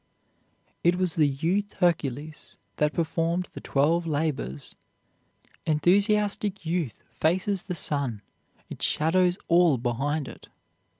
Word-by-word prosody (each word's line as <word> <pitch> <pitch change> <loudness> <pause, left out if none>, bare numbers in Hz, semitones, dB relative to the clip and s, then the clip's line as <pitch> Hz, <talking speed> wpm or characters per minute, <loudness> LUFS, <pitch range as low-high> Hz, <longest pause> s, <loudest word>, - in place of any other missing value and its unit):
It 175 +1 +4
was 180 -2 0
the 155 -3 +3
youth 170 +9 -1
Hercules 155 -4 -2 0.2
that 150 0 +2
performed 170 +2 -1
the - - -8
Twelve 165 +5 +1
Labors. 145 - -2 0.9
Enthusiastic 200 +4 +2
youth 160 - -2
faces 185 +4 0
the 180 - -5
sun, 140 -9 -1 0.4
it - - -9
shadows 175 +3 +2
all 170 -4 +5
behind 135 +5 -1
it. - - -11
165 Hz, 110 wpm, -26 LUFS, 145-180 Hz, 0.9 s, all